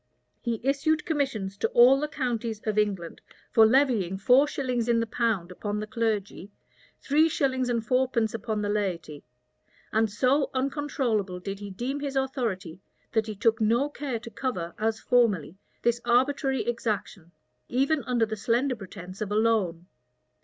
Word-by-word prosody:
He 235 -2 -2
issued 290 +4 +1
commissions 260 - -2
to - - +1
all 255 +3 +7
the 300 - -1
counties 240 -6 -3
of 215 -1 +1
England, 195 -5 -2 0.3
for 220 -1 +7
levying 225 -8 +2
four 250 +8 +5
shillings 250 -5 -2
in 235 -1 +3
the 230 - 0
pound 220 -6 -1
upon 205 +3 -3
the 215 - -3
clergy, 215 -4 -2 0.5
three 310 +3 +3
shillings 260 -4 0
and 230 -2 -1
fourpence 250 -2 +1
upon 220 -2 -3
the 205 - -1
laity; 175 -8 -2 0.7
and 220 -1 +2
so 260 +7 +2
uncontrollable 260 -8 -1
did 195 +2 -6
he 205 -1 -7
deem 245 +9 -3
his 280 -1 -4
authority, 230 - -2 0.3
that 220 -1 +1
he 215 - -5
took 220 +2 +1
no 235 +6 +2
care 280 -4 -4
to 230 +1 -10
cover, 180 -12 -3
as 220 0 0
formerly, 205 -9 +1 0.2
this 235 0 +1
arbitrary 265 +2 +2
exaction, 210 -7 -3 0.4
even 275 +3 +1
under 240 -2 +2
the 220 0 -4
slender 240 +5 +1
pretence 185 -2 -10
of 210 -1 -3
a - - 0
loan. 210 -7 +1
230 Hz, 160 wpm, -27 LUFS, 205-260 Hz, 0.7 s, all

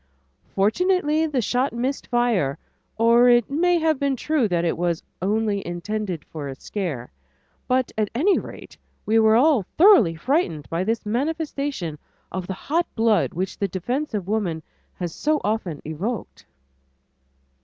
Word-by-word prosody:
Fortunately 315 - +2
the 270 -6 -1
shot 250 +5 0
missed 255 +4 -2
fire, 235 - +1 0.4
or 235 +2 +5
it 240 +1 +4
may 350 +4 +3
have 320 -3 +1
been 280 -1 +1
true 285 -2 +1
that 175 -3 0
it 165 - +1
was 170 -1 -1 0.2
"only 205 +1 0
intended 180 0 -4
for 150 -3 -7
a 135 - -6
scare," 155 - -5 0.6
but 255 -1 +1
at 215 -2 0
any 370 +11 +3
rate, - - -10 0.3
we 225 +1 +3
were 220 0 +5
all 275 0 +4 0.2
thoroughly 315 - +6
frightened 205 - -1
by 165 +2 0
this 225 +3 -1
manifestation 275 - -2 0.3
of 185 0 -4
the 190 - -3
hot 330 - -1
blood 225 -5 +2
which 185 +2 -3
the 200 - +1
defense 245 - -3
of 195 -3 -3
woman 190 -7 -1 0.3
has 175 -3 -4
so 305 0 0
often 205 -8 -2
evoked. 185 +9 -5
220 Hz, 150 wpm, -23 LUFS, 180-280 Hz, 0.6 s, thoroughly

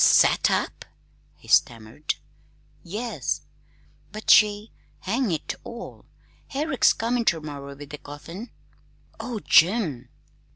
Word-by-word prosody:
"S - - +7
sat - - +4
up!" - - -1 0.5
he - - -19
stammered. 115 +6 +1 0.7
"Yes." 220 +7 -3 0.7
"But 215 +1 +1
she 210 0 +5 0.3
hang 230 +3 0
it 160 - -2
all, 235 0 -9 0.4
Herrick's 280 -2 +2
comin' 235 +1 0
ter 170 -7 +2
morrer 140 -2 -8
with 145 0 -11
the 150 - -7
coffin!" 165 +10 -9 0.7
"Oh, 240 -3 -4
Jim!" 165 - +3
195 Hz, 115 wpm, -25 LUFS, 145-230 Hz, 0.7 s, S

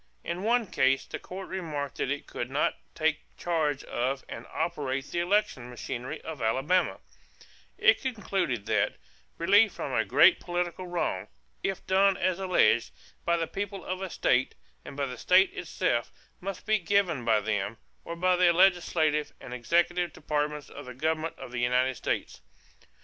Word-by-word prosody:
In 175 +2 -3
one 235 +3 +2
case 135 -7 +2
the - - -6
Court 190 +1 -8
remarked 155 -7 -4
that - - -1
it 145 +1 -2
could 120 - -5
not 140 +3 +1 0.2
take 160 -1 +1 0.2
charge 155 -5 0
of 135 +3 -2
and - - -8
operate 140 -5 -2
the 170 - -1
election 175 - +1
machinery 125 +4 -5
of 160 -4 -7
Alabama; 135 +11 +1 0.8
it - - +5
concluded 190 - -2
that - - +1 0.4
"relief 205 +5 +5
from - - -5
a - - +2
great - - +6
political 175 +1 -3
wrong, 135 - -2 0.3
if 195 -1 -3
done 195 0 +4
as 185 0 0
alleged, 185 -10 +3 0.4
by 170 0 +3
the 165 - 0
people 195 +1 -5
of 185 +1 -3
a 190 - -3
state 125 -5 +1 0.3
and 140 - -10
by 140 - 0
the 125 -3 -7
state 185 +1 +4
itself, 120 -8 -1 0.3
must 195 +1 -6
be 215 0 +3
given 180 -7 +1
by 110 -2 +3
them, 105 0 -2 0.3
or 170 - -6
by 180 +1 +3
the 180 -1 +5
legislative 170 -4 +3
and 125 - -9
executive 175 +7 +1
departments 150 -1 -2
of - - -10
the 125 - -8
government 160 +3 -1
of - - -9
the 120 -1 -3
United 125 +2 +2
States." - - -3
165 Hz, 165 wpm, -28 LUFS, 130-185 Hz, 0.8 s, great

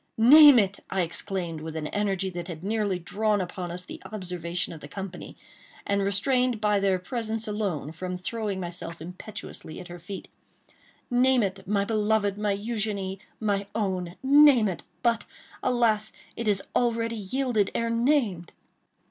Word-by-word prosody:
"Name 285 +4 +9
it!" 200 -3 +2
I 190 - 0
exclaimed 170 -1 -2
with 160 0 -6
an 155 -1 -3
energy 195 +1 -1
that 175 -1 -6
had 170 -2 -7
nearly 205 -2 0
drawn 210 +4 0
upon 180 -1 -4
us 180 +1 -4
the - - -9
observation 180 -4 -3
of 160 - -9
the 145 - -10
company, 190 +2 -7 0.5
and 200 0 +1
restrained 245 +5 +1
by 210 -1 +2
their 195 -1 +2
presence 225 +3 -3
alone 200 -8 -2
from 180 +2 -5
throwing 205 +1 -3
myself 170 -2 -5
impetuously 180 0 -8
at 180 - -10
her 175 0 -8
feet. 190 +3 -8 0.8
"Name 250 0 +4
it, 190 0 -4
my 200 0 +1
beloved, 215 -2 +1
my 205 -1 0
Eugénie, 205 -3 -2 0.2
my 200 -2 0
own!—name 225 +7 +4
it!—but, 230 +5 -2 0.4
alas! 225 -4 +2 0.2
it 230 - -4
is 200 -2 +2
already 230 -1 +1
yielded 220 0 0
ere 230 0 0
named." 230 - +1
200 Hz, 150 wpm, -27 LUFS, 180-225 Hz, 0.8 s, Name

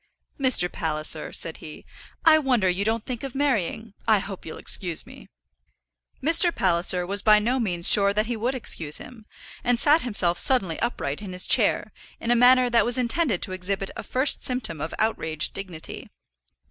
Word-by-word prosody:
"Mr. 255 -9 +2
Palliser," 155 -2 -2
said 165 - -2
he, 155 -1 -12 0.4
"I 315 -1 +6
wonder 250 -9 0
you 180 +2 -1
don't 220 +1 -2
think 245 -3 -6
of 270 -2 -8
marrying. 225 -6 -2
I 220 -1 +4
hope 195 -2 -7
you'll 160 - -8
excuse 175 -4 -2
me." - - -15 0.9
Mr. 335 +3 +4
Palliser 180 - 0
was 200 +2 -3
by 210 0 +5
no 240 +5 -1
means 175 -7 0
sure 200 -1 +7
that 210 +2 -1
he 240 +1 -4
would 240 +4 -3
excuse 160 -11 0
him, 230 -3 -12 0.4
and 245 -1 0
sat 305 +5 +3
himself 180 -7 +1
suddenly 195 -11 +2
upright 145 - -4
in 195 -3 -8
his 180 - +1
chair - - +2 0.3
in 235 - -3
a - - +3
manner 250 +1 +4
that 235 -2 +2
was 240 +2 +4
intended 245 - 0
to - - -4
exhibit 190 +1 -4
a - - -6
first 260 +3 +1
symptom 225 - -2
of 160 - -5
outraged 160 -8 0
dignity. 185 -5 -6
210 Hz, 180 wpm, -23 LUFS, 180-250 Hz, 0.9 s, sure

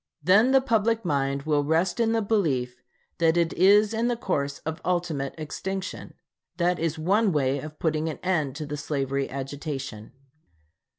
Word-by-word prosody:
Then 200 - +5
the 265 0 +5
public 225 -3 +1
mind 140 -3 0
will 150 -1 +1
rest 165 +7 +1
in 225 -1 +2
the 225 -1 +1
belief 135 - 0 0.4
that 165 0 +3
it 170 -1 +1
is 205 +4 +5
in 230 +2 0
the 240 - +1
course 140 -10 -2
of 160 0 -4
ultimate 170 -6 -1
extinction. 190 +5 -5 0.4
That 175 0 +1
is 165 0 -1
one 195 +6 +2
way 140 -3 +1
of 155 +2 -9
putting 160 -1 0
an 155 - -5
end 155 -8 0
to 155 - -5
the 150 0 -5
slavery 140 -2 -2
agitation. 135 -4 -6
160 Hz, 165 wpm, -26 LUFS, 140-195 Hz, 0.4 s, Then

